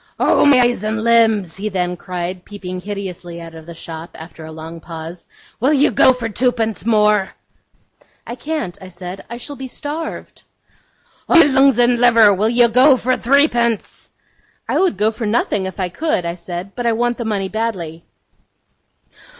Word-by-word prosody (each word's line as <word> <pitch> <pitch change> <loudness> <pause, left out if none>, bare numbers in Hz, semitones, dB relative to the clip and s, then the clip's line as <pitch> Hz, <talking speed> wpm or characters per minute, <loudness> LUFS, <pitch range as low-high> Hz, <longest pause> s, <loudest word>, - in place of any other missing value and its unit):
'Oh, - - +4
my 270 -3 +6
eyes 240 -4 +1
and 220 +1 -2
limbs!' 220 -7 +3
he 210 +2 -3
then 180 -2 -2
cried, 180 0 -5
peeping 185 -3 -7
hideously 185 -4 -6
out 165 -1 -10
of 160 0 -12
the 170 - -9
shop, 165 0 -8
after 160 0 -11
a 160 - -9
long 160 +1 -9
pause, 165 +1 -9 0.3
'will 265 +6 +2
you 285 -1 +3
go 250 - +5
for 250 -3 -3
twopence 225 -2 -1
more?' 210 -3 +2 0.9
'I - - -6
can't,' 300 - -4
I 190 - -9
said; 180 +1 -8
'I 235 - -6
shall 285 +4 -6
be 265 -1 -7
starved.' 300 +5 -6 0.9
'Oh, - - +6
my 335 - +9
lungs 270 -2 +4
and 240 0 +3
liver, 230 -4 +6
will 210 +3 +1
you 240 0 +5
go 255 +4 +5
for 255 +1 0
threepence?' 240 -5 +1 0.6
'I - - 0
would 370 - +1
go 210 +2 +2
for 225 0 -4
nothing, 210 -3 0
if 190 +2 -8
I 185 -1 -1
could,' 240 - -1
I 170 - -2
said, 175 +2 -7
'but 245 -1 -2
I 230 - +3
want 240 +2 -1
the - - -2
money 200 -3 -1
badly. 185 -7 -4
215 Hz, 180 wpm, -18 LUFS, 180-245 Hz, 0.9 s, my